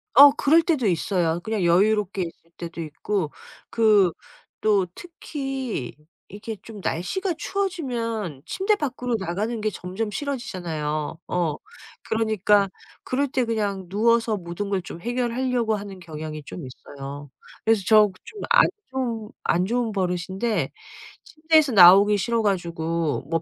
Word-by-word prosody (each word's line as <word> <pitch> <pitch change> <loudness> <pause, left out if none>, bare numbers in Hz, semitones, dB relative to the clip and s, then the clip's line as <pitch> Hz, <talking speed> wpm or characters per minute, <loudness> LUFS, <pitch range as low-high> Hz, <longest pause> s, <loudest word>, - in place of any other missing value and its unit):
어 280 +2 +10
그럴 300 +3 +4
때도 300 - +1
있어요. 170 -2 +1
그냥 220 -3 -1
여유롭게 200 +3 +2
있을 165 0 -10
때도 170 -1 -6
있고 160 +2 -3 0.4
그 210 -5 +4 0.5
또 205 -4 +2
특히 270 - -5 0.3
이렇게 215 +3 -6
좀 215 -3 -10
날씨가 360 - -2
추워지면 240 - -3
침대 390 +3 +1
밖으로 250 -8 -3
나가는 210 +5 -2
게 215 - +1
점점 190 +3 -4
싫어지잖아요. 175 - -3
어. 170 -4 0 0.5
그러니까 210 -2 +3 0.4
그럴 280 +3 0
때 255 -1 0
그냥 205 -4 -2
누워서 230 +3 +2
모든 180 +2 -5
걸 195 -2 +1
좀 170 - -9
해결하려고 240 0 0
하는 200 -2 -7
경향이 155 -2 -7
좀 155 +2 -8
있어요. 140 +2 -9 0.4
그래서 220 -3 +3
저 215 -1 +7 0.2
좀 420 - -10
안 - - +6 0.2
좋은 235 -5 -3
안 180 +2 +2
좋은 235 0 0
버릇인데 185 - -1 0.5
침대에서 315 -3 +2
나오기 200 +2 +8
싫어 230 +3 0
가지고 170 -5 -1
뭐 165 0 0
210 Hz, 285 characters per minute, -24 LUFS, 175-240 Hz, 0.5 s, 어